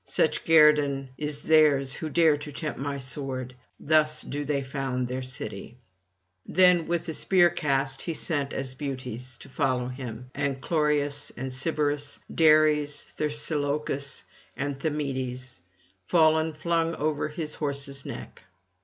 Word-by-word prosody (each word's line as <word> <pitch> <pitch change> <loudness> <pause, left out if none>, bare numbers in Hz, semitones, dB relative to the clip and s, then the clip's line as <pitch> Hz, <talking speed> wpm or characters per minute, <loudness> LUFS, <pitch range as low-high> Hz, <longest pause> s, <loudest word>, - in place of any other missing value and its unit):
Such - - +1
guerdon 150 -4 +4
is 150 0 -3
theirs 145 -4 +4
who 160 - -4
dare 160 -1 +4
to 145 0 -8
tempt 155 +2 -4
my 140 +1 -3
sword; 130 -1 -2 0.3
thus 155 0 +3
do 145 +1 -4
they 140 -1 -1
found 130 -2 -3
their 130 +1 -4
city.' 130 -1 -4 0.7
Then 180 -2 +4
with 170 0 -2
a 160 - -3
spear 175 0 +3
cast 135 -4 0
he 165 - -3
sends 145 -3 -2
Asbutes 130 -2 -5
to - - -13
follow 130 -2 -1
him, 125 -1 -8
and 140 -2 -1
Chloreus 145 -1 0
and 130 +1 -4
Sybaris, 145 +1 0 0.2
Dares 155 -2 +4
and - - -24
Thersilochus, 145 -2 -1 0.3
and 140 -1 -3
Thymoetes 130 - -3 0.5
fallen 160 -1 +3
flung 165 +1 -1
over 155 0 -1
his 155 0 -3
horse's 140 -2 0
neck. - - -9
145 Hz, 135 wpm, -26 LUFS, 135-155 Hz, 0.7 s, guerdon